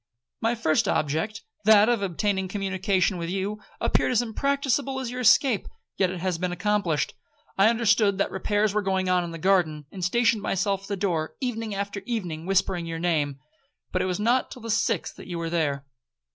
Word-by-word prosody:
My 230 +1 +1
first 160 -9 +1
object, 160 +9 -1 0.2
that 215 -1 +6
of 240 -3 +2
obtaining 195 +1 0
a - - -5
communication 190 0 0
with 170 0 -3
you, 195 +3 -2 0.2
appeared - - +1
as 245 -1 +3
impracticable 275 +2 0
as 250 -2 -4
your 250 - -5
escape, 235 0 +4 0.3
yet 190 - +2
it 185 -1 -5
has 180 -2 -1
been 180 0 -1
accomplished. 180 -3 0 0.4
I 195 +3 +5
understood 220 -3 +3
that 200 - 0
repairs 205 +2 0
were 210 - +1
going 190 -1 0
on 180 -1 +3
in 170 - -5
the 165 - -6
garden, 165 -4 +1
and 185 -2 -7
stationed 230 +3 +2
myself 195 0 0
at 195 - -12
the 200 - -3
door 170 -5 -1
evening 225 -5 -3
after 200 0 -3
evening, 180 -9 -3
whispering 185 -3 +1
your 165 0 -4
name, 155 -5 0 0.5
but 185 - 0
it - - 0
was 185 0 -2
not 240 +4 +2
till 250 - -10
the 230 - -3
sixth 225 -3 0
that - - -11
you 175 -2 -4
were 165 -1 -3
there.' 145 -5 0
195 Hz, 200 wpm, -26 LUFS, 175-220 Hz, 0.5 s, that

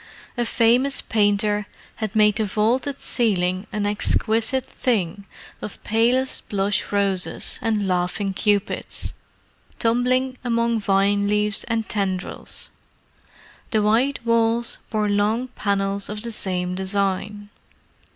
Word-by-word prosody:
A 240 -1 0
famous 245 +5 +3
painter 205 -1 +1 0.3
had 220 -1 -4
made 210 -1 +4
the 220 - +2
vaulted 230 +7 0
ceiling 185 -4 0
an 210 -1 -1
exquisite 225 +4 +1
thing 205 -7 -1 0.4
of 210 - -7
palest 240 +4 +1
blush 200 0 0
roses 200 -2 0
and 215 -3 0
laughing 185 +2 0
Cupids, 205 +1 -1 0.6
tumbling 250 +2 +1
among 235 -1 +1
vine 200 0 +2
leaves 210 0 +1
and 225 -2 -1
tendrils. 190 -3 -3 1.0
The 220 -4 +1
white 240 +7 +2
walls 230 0 +2
bore 215 -2 0
long 210 +5 +1
panels 200 -3 -1
of 210 +1 -5
the 235 - -4
same 180 -4 -2
design. 200 +2 -1
210 Hz, 110 wpm, -23 LUFS, 200-230 Hz, 1.0 s, made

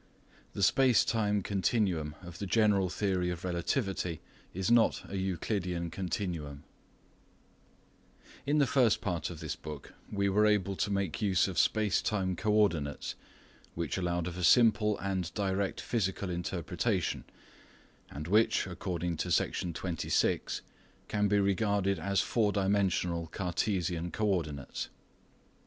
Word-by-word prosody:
THE 100 - -2
SPACE 130 +4 +5
TIME 105 -3 +1
CONTINUUM 95 -7 0
OF 85 0 -10
THE 100 - -3
GENERAL 100 -3 +3
THEORY 90 -2 0
OF 90 -1 -5
REALTIIVTY 90 - -1 0.3
IS 95 +4 -1
NOT 120 -1 +4
A - - -10
ECULIDEAN 90 -2 -2
CONTINUUM 85 -5 -4 1.8
In 145 +2 +3
the 145 - +5
first 125 -4 +3
part 90 -8 -2
of 85 -3 -8
this 75 -2 -3
book 75 -3 -9 0.2
we 100 -1 +1
were 105 +2 +4
able 100 -2 +1
to 100 - -1
make 100 -4 -1
use 95 -3 +3
of 95 - -1
space 105 -4 +2
time 95 -4 -1
co 105 +4 0
ordinates 85 -10 +1 0.6
which 85 0 -2
allowed 85 -1 -1
of 90 +1 -5
a - - -3
simple 105 +2 +5
and 95 -3 -2
direct 100 -1 -1
physical 95 -4 -1
interpretation, 85 -1 -1 0.9
and 75 +3 -7
which, 110 +5 +3
according 90 -2 -3
to 90 - -2
Section 85 0 0
26, 85 +1 -1 0.5
can 105 -1 +1
be 105 +1 +3
regarded 100 0 +1
as 100 -1 +1
four 110 -4 +1
dimensional 95 -4 +1
Cartesian 90 -1 -1
co 110 - -2
ordinates. 80 -8 -2
95 Hz, 135 wpm, -31 LUFS, 85-105 Hz, 1.8 s, SPACE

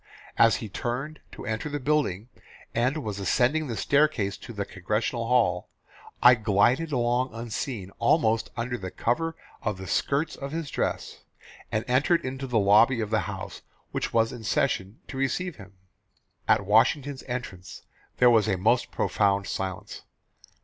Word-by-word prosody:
As 115 -1 +5
he 110 - -5
turned 125 +9 -4
to - - -9
enter 110 +7 -3
the 145 0 -3
building, 130 -8 0 0.5
and 130 +6 0
was 105 -2 -4
ascending 130 +10 +1
the 115 -3 -4
staircase 140 -9 +2
to 120 - -10
the 100 -3 -4
Congressional 110 +5 -2
hall, 110 -8 +2 0.5
I 125 - +10
glided 120 +8 +2
along 125 -1 0
unseen, 115 -3 -4
almost 115 -3 +2
under 120 +1 -2
the 95 -1 -5
cover 165 - -1 0.3
of 105 -4 -2
the 95 - -8
skirts 140 - 0
of 140 +1 -7
his 165 -3 -4
dress, - - -3 0.5
and 110 +2 -1
entered 135 +7 +2
into 135 +1 -4
the 125 -3 0
lobby 110 +5 +5
of 110 -1 -3
the 110 - +3
House 95 -2 -7 0.3
which - - -2
was 115 0 +2
in 120 -2 -8
session 100 -1 0
to 135 - -7
receive 145 +6 -1
him. 100 -1 -13 0.7
"At 105 -2 +3
Washington's 130 +6 +2
entrance 120 -8 -6 0.3
there 125 -1 +6
was 110 -2 +4
a 95 -3 +1
most 115 +7 +2
profound 100 -1 +1
silence. 95 -2 -5
115 Hz, 155 wpm, -26 LUFS, 105-135 Hz, 0.7 s, I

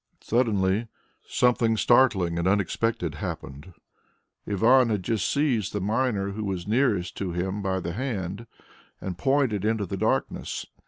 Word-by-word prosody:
Suddenly 110 -2 +1 0.4
something 120 -2 +2
startling 100 -10 +3
and 85 - 0
unexpected 100 -2 0
happened. 75 +2 -7 0.8
Ivan 115 +5 +4
had 105 -4 -1
just 110 -3 0
seized 125 -9 0
the 105 - -1
miner 105 -1 0
who 110 +2 -5
was 95 -3 -3
nearest 105 -6 +1
to 95 -3 -3
him 95 +4 -2
by 95 -1 -1
the 85 -1 -4
hand, 105 -3 -4 0.5
and 95 -2 -5
pointed 130 -2 +1
into 110 -1 0
the 85 - -4
darkness. - - -1
105 Hz, 140 wpm, -26 LUFS, 95-115 Hz, 0.8 s, Ivan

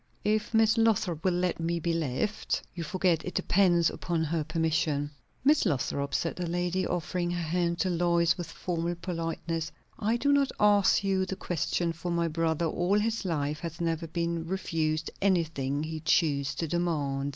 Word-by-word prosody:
"If 210 0 +1
Miss 225 0 +4
Lothrop 190 -8 +1
will 185 -2 +2
let 180 -1 0
me 170 +1 -1
be 170 +1 -1
left. 165 - -1
You 170 - -5
forget, 180 -1 +1
it 180 - -6
depends 175 -4 +3
upon 170 -2 -2
her 160 0 -1
permission." 155 -2 0 0.3
"Miss 295 +3 +4
Lothrop," 140 - -1
said 165 - -1
the 180 -1 -2
lady, 175 +2 0
offering 175 0 -2
her 175 -1 -2
hand 170 +1 0
to 185 - +1
Lois 170 0 +2
with 175 -3 -5
formal 170 0 -2
politeness, 165 -1 -3 0.3
"I 225 +2 +1
do 285 +4 +2
not 280 -1 +3
ask 205 -1 +4
you 190 -1 +1
the 190 - -3
question, 175 -1 -1
for 170 +2 -5
my 170 -1 +1
brother 165 0 0
all 175 +5 +1
his 220 0 0
life 150 -3 -1
has 170 0 -6
never 165 -1 -1
been 170 0 -2
refused 160 -4 -1
anything 160 -7 +1
he 160 0 -4
chose 150 -3 +1
to 165 - -2
demand. 145 -5 -1
170 Hz, 175 wpm, -29 LUFS, 160-185 Hz, 0.3 s, Miss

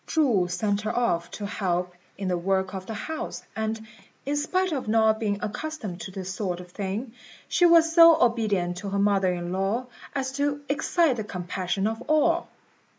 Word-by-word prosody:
Chu 245 - +2
sent 200 +3 -1
her 215 +2 -2
off 170 -9 +1
to 205 - -6
help 180 -3 -1 0.2
in 195 - -3
the 180 - +1
work 190 +1 0
of 190 -1 -6
the 225 - -4
house, 315 +8 -5
and, 220 0 -3 0.4
in 285 +2 -1
spite 370 +5 0
of 270 -7 -3
not 220 0 +3
being 205 -2 0
accustomed 210 - -5
to - - -6
this 190 0 -5
sort 185 -3 -3
of 180 0 -11
thing, 205 +5 -4 0.3
she 350 - +4
was 330 -1 +5
so 330 -1 +8
obedient 210 - +1
to 200 +2 -5
her 200 - -1
mother 200 -2 +3
in 175 0 -4
law 195 +7 0 0.3
as 265 -1 -1
to 285 +1 -1
excite 305 -1 +2
the 220 - -2
compassion 185 0 -3
of 225 +2 -2
all. 320 +3 +3
215 Hz, 185 wpm, -26 LUFS, 190-280 Hz, 0.4 s, so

